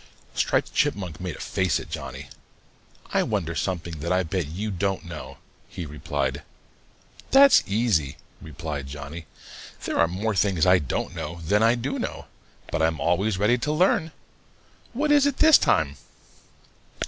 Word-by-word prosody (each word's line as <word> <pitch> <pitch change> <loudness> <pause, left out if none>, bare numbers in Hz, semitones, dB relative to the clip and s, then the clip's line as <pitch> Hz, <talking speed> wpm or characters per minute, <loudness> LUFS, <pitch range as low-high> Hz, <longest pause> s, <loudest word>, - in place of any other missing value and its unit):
Striped - - 0
Chipmunk 90 -5 -1
made 90 -3 -4
a - - -12
face 95 -1 0
at - - -10
Johnny. - - -6 0.9
"I - - +3
wonder 95 -7 -1
something 85 -3 -3
that 85 +4 -3
I 90 0 +2
bet 90 -2 -2
you 100 +8 -4
don't 95 0 -2
know," 85 -3 -8 0.3
he 90 - -6
replied. 75 0 -3 0.9
"That's 275 +1 +7
easy," 100 - +1 0.2
replied 75 -3 -6
Johnny. 75 +3 -8 0.6
"There - - -2
are 85 - +5
more 100 +6 -2
things 95 -4 +2
I 90 0 +6
don't 70 - -3
know 85 +3 -6
than 105 +6 +2
I 115 +2 +4
do 125 +3 -3
know, - - -5 0.5
but - - -1
I'm 80 0 +1
always 95 +4 +1
ready 110 +5 +2
to 150 - -1
learn. 165 0 +2 0.8
What 295 +5 0
is 285 -1 +5
it 285 - -1
this 315 0 +7
time?" - - +1
90 Hz, 155 wpm, -25 LUFS, 80-110 Hz, 0.9 s, That's